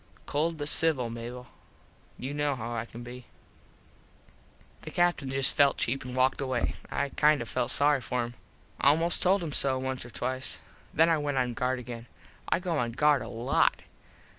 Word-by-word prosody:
Cold 160 +3 -1
but 145 -1 -4
civil, 150 -7 +1
Mable. 120 +2 -7 0.7
You 135 +3 -5
kno 145 -1 0
how 120 -1 -5
I 115 0 -3
can 120 +1 -10
be. 125 0 -10 1.5
The - - -8
Captin 175 -6 +1
just 135 0 +3
felt 140 -1 +4
cheap 130 +3 -1
an 125 0 -7
walked 130 +2 +2
away. 130 -3 -1
I 140 - -1
kind 150 +1 +3
of 120 - -5
felt 125 +1 -1
sorry 145 -1 +3
for 120 +2 -1
him. 120 0 -6 0.5
Almost 165 +5 +4
told 185 0 +3
him 155 -4 -4
so 135 -1 +4
once 130 0 -3
or 120 - -10
twice. 130 +2 -3 0.3
Then 165 +1 +4
I 165 -2 +2
went 145 -2 -2
on 125 -2 0
guard 125 +2 -1
again. 120 -1 -8 0.4
I - - +3
go 175 -4 -1
on 120 -1 -2
guard 150 +1 +3
a - - -6
lot. 120 +3 +1
130 Hz, 185 wpm, -28 LUFS, 125-145 Hz, 1.5 s, felt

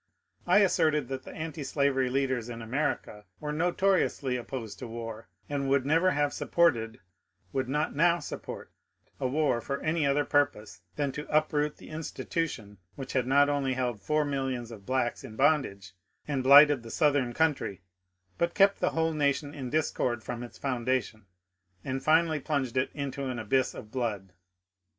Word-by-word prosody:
I - - +5
asserted 155 -8 +2
that 135 -1 -5
the - - -9
antislavery 140 -4 -1
leaders 130 -3 -1
in 115 -1 -6
America 115 -4 -2
were 150 0 -4
notoriously 175 -5 +1
opposed 115 -4 -6
to 125 - -6
war, 115 -1 -7 0.2
and 140 -2 -2
would 135 -1 +2
never 165 +6 +3
have 145 -4 +1
sap - - -5
ported 120 -9 +3 0.3
— - - -40
would 130 -2 -1
not 150 +2 -1
now 170 +3 +4
support 165 - -7 0.2
— - - -39
a 130 - 0
war 135 -3 +1
for 140 +3 -3
any 155 -2 +1
other 145 +1 +2
pur 145 0 +4
pose 105 -7 -14 0.2
than 140 -2 -1
to 150 +2 -7
uproot 150 -1 +1
the - - -13
institution 155 - -4 0.2
which 135 - -7
had 130 -2 +1
not 140 +2 +5
only 140 -2 0
held 120 -5 -2
four 150 0 +1
millions 135 -4 -3
of 105 -4 -11
blacks 130 -2 -1
in 115 -5 -9
bondage 135 - +1 0.4
and 140 -3 -1
blighted 140 +1 +8
the 115 - -10
Southern 145 -3 +2
country, 135 - 0 0.6
but 170 0 0
kept 200 0 +4
the 180 - +2
whole 160 0 +2
nation 145 -1 0
in 135 -4 -5
discord 125 -5 0
from 120 -1 -5
its 120 - -9
founda 130 -1 0
tion 110 -3 -15 0.6
and 135 0 -3
finally 160 0 +3
plunged 135 -3 -2
it 130 +1 +1
into 140 -1 -4
an 130 -2 -3
abyss 125 +4 0
of 105 - -10
Uood. 110 -7 -3
135 Hz, 175 wpm, -29 LUFS, 120-150 Hz, 0.6 s, blighted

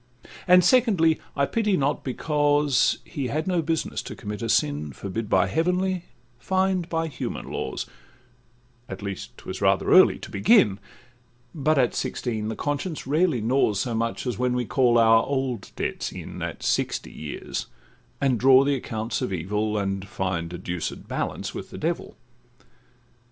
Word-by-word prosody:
And, 180 0 +7
secondly, 190 -9 +4 0.2
I 140 - +2
pity 210 +2 +1
not, 140 -1 0
because 145 +1 +2
He 140 -5 -4
had 155 +6 -2
no 180 -2 +1
business 160 0 -2
to - - -8
commit 105 +1 -6
a 115 - -3
sin, 75 -5 +1
Forbid 105 - -5
by 95 -3 +4
heavenly, 180 - 0 0.3
fined 185 +3 0
by 165 0 0
human 145 -6 -5
laws, - - -3 1.0
At 95 +1 -7
least 100 -2 -6
'twas - - -7
rather - - +2
early - - +7
to - - -10
begin; 105 - +4 0.7
But 155 0 +1
at 125 -3 +3
sixteen 110 -4 -3
the 110 - -3
conscience 145 +3 -3
rarely 150 -2 +2
gnaws 110 -3 +2
So 120 - -2
much 115 +3 -2
as 125 -3 -3
when 125 0 +1
we 125 -1 -1
call 120 0 +3
our 115 0 +6
old 130 -6 -2
debts - - -3
in - - -8
At - - -5
sixty - - -1
years, 75 -1 -5 0.5
and 135 -4 +1
draw 130 +2 +7
the 140 +1 +1
accompts 115 -3 -3
of 125 - -2
evil, 105 +5 -1
And 100 -1 -2
find 90 -3 -3
a 90 - -5
deuced 90 -1 -5
balance - - -3
with - - -7
the - - -9
devil. - - -3
125 Hz, 160 wpm, -25 LUFS, 105-160 Hz, 1.0 s, And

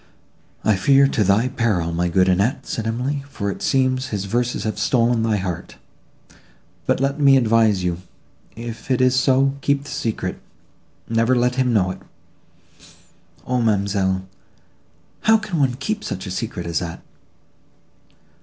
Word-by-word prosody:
—" - - -36
"I 105 -2 +3
fear, 135 +8 +5
to 110 - +1
thy 100 +5 +3
peril, 100 -9 0
my 90 +1 0
good 95 +1 +3
Annette," 100 +7 +1
said 115 -1 -3
Emily; 130 +5 -2
"for 100 -7 -3
it - - -8
seems 130 -1 +1
his 100 -4 -3
verses 120 +4 -1
have 110 -2 -3
stolen 120 0 +2
thy 110 -2 +1
heart. 90 -3 -5 1.1
But - - +2
let 140 +2 -1
me 140 -2 +6
advise 110 -5 +3
you; 90 0 -2 0.5
if 115 +2 -8
it 130 - +2
is 130 0 +4
so, 135 +1 +3
keep 140 0 +1
the 145 - -10
secret; 115 -2 -3 0.7
never 115 +2 +2
let 125 0 +2
him 125 -1 +1
know 95 -5 +2
it." - - -8 1.5
"Ah—ma'amselle!—how 100 - -2
can 200 -6 -4
one 130 -3 +2
keep 210 +11 -3
such 95 - -5
a 95 - -6
secret 95 -3 -4
as 85 -2 -1
that?" 85 -2 -6
115 Hz, 150 wpm, -21 LUFS, 95-130 Hz, 1.5 s, me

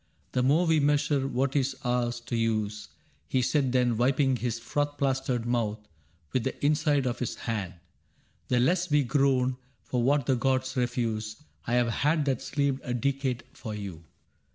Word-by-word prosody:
*"The 125 - +1
more 145 +7 +3
we 160 -2 +3
measure 145 -1 +2
what 135 +1 -1
is 135 -1 +1
ours 120 -1 0
to 120 0 -4
use,' 110 -2 -1 0.4
He 130 - +1
said 135 -1 +1
then, 125 -2 +2
wiping 130 +2 +3
his 120 -1 -2
froth 145 +5 -2
plastered 130 -3 0
mouth 115 -3 0 0.6
With 130 - +1
the - - -3
inside 150 -2 +2
of 125 -1 -2
his 125 - -2
hand, 100 -6 -4 0.3
* - - -39
" - - -39
the 125 - +2
less 175 +7 +2
we 150 -1 +4
groan 130 -1 +2 0.3
For 125 - -1
what 140 +2 +2
the 130 - +2
gods 130 +1 0
refuse." 115 -2 -2 0.2
I 120 0 +3
've 120 -1 +1
had 150 +5 +1
that 135 -4 0
sleeved 140 -2 -1
A 125 - -2
decade 130 0 -1
for 110 -3 -6
you. 95 -6 -7
130 Hz, 175 wpm, -28 LUFS, 120-140 Hz, 0.6 s, we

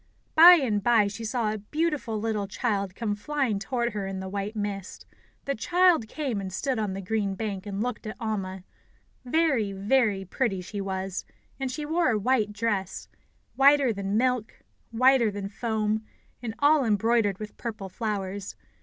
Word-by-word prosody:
By 340 +3 +10
and 245 -11 +2
by 230 -1 +4
she 205 +3 -5
saw 225 -1 -1
a 215 - -5
beautiful 295 -1 -2
little 210 -2 -1
child 200 -3 -2
come 220 -2 -1
flying 245 -1 -1
toward 235 +2 -2
her 200 -2 -3
in 195 -1 -4
the 190 - -5
white 200 +2 -4
mist. 200 -2 -5 0.4
The 275 - 0
child 345 0 +3
came 255 -5 -3
and 190 -1 -5
stood 255 +6 -1
on 210 -3 -1
the 195 +1 -5
green 205 -1 -1
bank, 205 -2 -4
and 200 +1 -2
looked 250 -2 -4
at 215 - -5
Alma. 195 -5 -3 0.6
Very, 255 -8 +1
very 205 -1 +1
pretty 195 0 -1
she 200 +3 -5
was; 190 -1 -3 0.4
and 265 -1 -2
she 295 +3 -4
wore 330 +1 +2
a 225 - +2
white 215 -1 +1
dress 205 -3 -2 0.5
whiter 275 -2 +5
than 200 +1 -2
milk, 250 -2 0 0.3
whiter 250 0 +4
than 200 -1 -5
foam, 220 0 -1 0.4
and 225 -2 -5
all 290 0 +4
embroidered 220 -2 +2
with 210 0 -8
purple 215 -4 -5
flowers. 200 -1 -4
215 Hz, 170 wpm, -27 LUFS, 200-250 Hz, 0.6 s, By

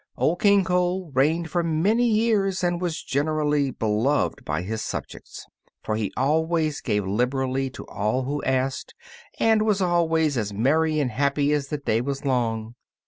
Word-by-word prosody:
Old 170 +3 0
King 200 -1 +5
Cole 180 -1 0
reigned 155 +5 +1
for 175 - +1
many 185 +9 +2
years, 215 -4 +1
and 175 0 0
was 175 -3 -3
generally 150 0 0
beloved 115 +4 0
by 75 +3 -2
his 110 +3 -4
subjects; - - -7 0.4
for 110 - -2
he 110 -3 -2
always 155 +2 +1
gave 105 -1 -1
liberally 130 +5 -1
to 130 - -10
all 110 +6 -1
who 145 +3 -3
asked, 130 0 -2 0.4
and 220 -1 +3
was 210 -2 +1
always 165 -5 +1
as 105 -2 -3
merry 155 +8 +2
and 135 -4 0
happy 140 +4 +1
as 145 -2 -1
the 150 - -3
day 115 -5 0
was 140 +2 -4
long. 115 -4 -1
145 Hz, 160 wpm, -24 LUFS, 130-170 Hz, 0.4 s, King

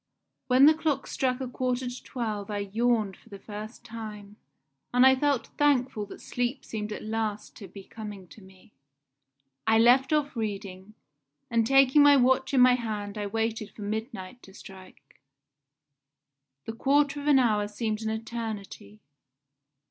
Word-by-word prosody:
"When 260 +2 +6
the 310 - +8
clock 310 -2 -1
struck 255 -1 -1
a 260 - -3
quarter 250 0 -2
to 245 0 -7
twelve 215 -5 -4
I 205 - -3 0.2
yawned 225 -4 +1
for - - -22
the 200 - -9
first 215 +3 -9
time, 210 -3 -9 0.6
and 250 +1 +5
I 265 0 +7
felt 280 -1 0
thankful 260 -7 +1
that - - -11
sleep 245 +2 -3
seemed 215 -1 -5
at - - -6
last 215 -1 -3
to 200 - -10
be 195 0 -12
coming 205 -3 -9
to 220 - -15
me. 190 +2 -19 0.9
I 220 - +5
left 245 +5 +5
off 300 -2 0
reading, 200 -2 -5 0.6
and 230 -1 +2
taking 270 +2 +5
my 285 0 +7
watch 260 +1 +2
in 265 -2 +4
my 250 0 +7
hand 215 -4 -4
I 205 -1 -3
waited 225 0 -2
for 210 - -8
midnight 220 +1 -5
to 195 - -16
strike. 190 -1 -15 1.5
This 225 - -6
quarter 285 +2 +2
of 285 - -6
an 290 -2 +6
hour 215 -5 +2
seemed 215 +1 -3
an 220 - -2
eternity. 220 - -6
225 Hz, 160 wpm, -27 LUFS, 210-255 Hz, 1.5 s, the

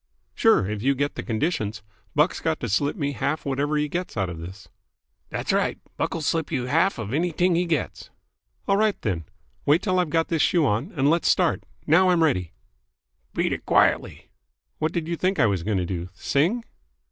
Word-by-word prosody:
"Sure, 225 - +4
if 105 0 -3
you 135 +3 +2
get 145 +2 -1
the - - -5
conditions. 110 - -2 0.3
Buck's - - +2
got - - -1
to - - -2
slip 140 +8 +1
me 145 -7 -1
half 140 +2 -1
of - - -24
whatever 145 +2 0
he 150 0 +1
gets 175 -2 -4
out 95 -3 0
of 85 - -7
this." 90 +2 -9 0.6
"Dat's - - -2
right. - - +1 0.2
Buck'll 165 - -2
slip 160 +1 0
youse 125 0 -2
half 165 +6 +3
of 110 0 -5
anyt'ing 175 +3 +1
he 175 +2 +1
gets." 160 -5 -2 0.6
"All 195 - +3
right, 215 -1 +2
then. 85 -6 -2 0.4
Wait 150 +6 +3
till 185 -3 +1
I've 180 -3 +1
got 165 +1 +1
this 165 -3 +1
shoe 170 -4 +3
on, 130 - 0
and 140 -4 +1
let's 165 +3 +3
start. 180 -3 +2 0.2
Now 180 +5 +5
I'm 175 -2 +4
ready." 90 - +1 0.8
"Beat - - +1
it - - -5
quietly." - - +1 0.5
"What 155 - 0
did 170 -3 -3
you 170 - -1
think 185 +3 0
I 120 - +5
was 100 -5 +1
going 100 +3 -1
to 90 - 0
do? 90 -1 -4
Sing?" 170 - +1
145 Hz, 205 wpm, -24 LUFS, 110-170 Hz, 0.8 s, Now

